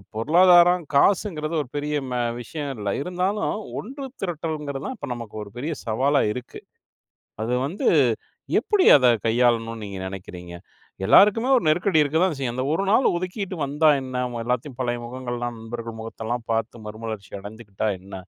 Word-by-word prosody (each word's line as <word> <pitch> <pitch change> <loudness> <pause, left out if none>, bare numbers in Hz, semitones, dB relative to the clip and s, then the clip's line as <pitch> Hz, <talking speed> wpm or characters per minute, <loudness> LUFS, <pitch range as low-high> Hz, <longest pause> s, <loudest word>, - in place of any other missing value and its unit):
பொருளாதாரம் 175 +7 +5
காசுங்கிறது 165 -2 +2
ஒரு 130 - -8
பெரிய 150 +1 -2 0.2
மே 125 - -1 0.2
விஷயம் 145 +1 -5
இல்ல. 100 -1 -3
இருந்தாலும் 185 +5 -1 0.3
ஒன்று 270 +4 -7 0.2
திரட்டல்ங்கிறது 155 -5 -4
தான் 260 - -4
இப்போ 145 - -6
நமக்கு 115 -3 -8
ஒரு 100 - -11
பெரிய 155 +6 -3
சவாலா 135 +6 +2
இருக்கு. 125 - -8 0.8
அது 120 +2 -1
வந்து 175 +8 -4 0.7
எப்படி 410 -3 +2
அதை 130 -3 +4 0.2
கையாளணும்னு 115 -1 +1
நீங்க 100 -1 -6
நினைக்கிறீங்க? 90 -2 -9 0.5
எல்லோருக்குமே 225 +5 +6
ஒரு - - -5
நெருக்கடி 175 +1 +3
இருக்க 150 +2 0
தான் 170 -6 0
செய்யும். 120 -3 -2
அந்த 130 - -1
ஒரு 195 - 0
நாள் 250 +5 +4
ஒதுக்கிட்டு 185 0 -4
வந்தா 150 +3 +3
என்ன? 130 -1 -3 0.2
எல்லாத்தையும் 125 +2 -2
பழைய 120 -1 -1
முகங்கள் 120 0 -5
எல்லாம் 120 -1 -4
நண்பர்கள் 115 0 -7
முகத்தை 110 0 -8
எல்லாம் 120 0 -3
பார்த்து 115 0 -3
மறுமலர்ச்சி 110 -2 -7
அடைந்துகிட்டா 105 0 -5
என்ன? 95 +1 -12
130 Hz, 155 wpm, -24 LUFS, 115-170 Hz, 0.8 s, எல்லோருக்குமே